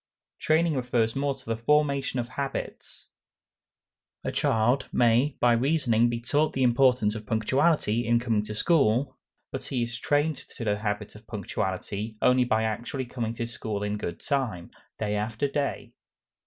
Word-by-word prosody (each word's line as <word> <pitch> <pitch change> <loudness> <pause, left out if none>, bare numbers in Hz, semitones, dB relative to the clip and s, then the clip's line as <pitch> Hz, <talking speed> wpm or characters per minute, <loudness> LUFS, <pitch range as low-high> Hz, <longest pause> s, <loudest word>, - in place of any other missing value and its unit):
Training 160 +1 +2
refers 120 -4 0
more 140 0 0
to 135 - -15
the 115 - -1
formation 140 +1 +1
of 120 0 -3
habits. 135 +1 -6 1.1
A - - -2
child 120 +5 +1
may 125 +4 +3
by 120 -1 +4
reasoning 120 -3 +2
be 120 0 -2
taught 145 +6 +1
the 130 - 0
importance 125 -3 +3
of 110 -1 -8
punctuality 120 0 +1
in 120 0 +4
coming 115 -3 +1
to 105 - -6
school; 130 -2 +2 0.4
but - - -5
he 125 -3 -1
is 120 0 -4
trained 145 +2 +1
to 130 - -9
the 105 -1 0
habit 105 -1 -3
of 105 +1 -15
punctuality 105 +1 -4
only 125 0 +4
by 110 -2 +1
actually 120 +4 -3
coming 115 -2 -4
to 115 - -3
school 110 -3 -4
in 105 0 -1
good 85 -4 -5
time, 125 - -2 0.3
day 105 -1 -1
after 110 +6 -1
day. 140 0 -3
120 Hz, 160 wpm, -27 LUFS, 110-135 Hz, 1.1 s, by